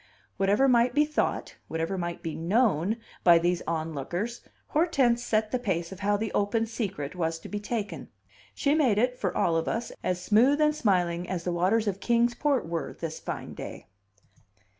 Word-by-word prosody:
Whatever 200 +7 +3
might 245 0 +3
be 300 +1 +5
thought, 305 0 -2
whatever 165 +4 -2
might 175 -2 -4
be 165 - -3
known, 200 +1 +1 0.3
by 170 -2 +7
these 175 +1 +1
onlookers, 165 - -3 0.3
Hortense 275 -7 +2
set 215 -2 0
the 255 - 0
pace 175 -7 -2
of 190 - -8
how 205 +1 +1
the 215 0 -3
open 225 +3 +1
secret 195 - -4
was 165 -2 -1
to - - -11
be 205 - -4
taken. 205 - -4 0.5
She 280 - +2
made 265 -10 +3
it, 250 +3 +2
for 185 -3 -1
all 165 - +2
of 165 - 0
us, 230 +2 -2
as 180 -1 0
smooth 235 +10 +4
and 300 0 +3
smiling 180 - +1
as 180 -3 -3
the 180 - -1
waters 195 +6 +2
of 195 -1 -1
Kings 235 +2 +2
Port 280 - 0
were 165 -1 -3
this 160 -1 -4
fine - - -6
day. - - -8
200 Hz, 185 wpm, -27 LUFS, 170-240 Hz, 0.5 s, by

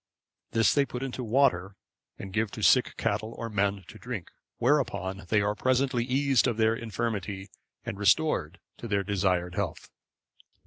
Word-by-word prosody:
This 115 -1 +3
they 140 - +4
put 125 -1 -5
into 130 -1 -4
water 105 -6 +2 0.4
and 95 -1 -8
give 110 0 +1
to - - -5
sick - - +4
cattle 110 +1 -2
or 115 -1 -5
men 100 -1 0
to 110 - -12
drink, 120 -9 -6 0.3
whereupon 120 -8 0
they 110 -2 +3
are 105 +1 +1
presently 130 +1 +1
eased 135 0 +2
of 120 -3 -1
their 110 0 +3
infirmity, 105 -4 -4 0.3
and 100 - -5
restored 100 - +2 0.2
to 120 - -6
their 100 -2 0
desired 90 -3 0
health. - - -4
110 Hz, 160 wpm, -28 LUFS, 100-125 Hz, 0.4 s, they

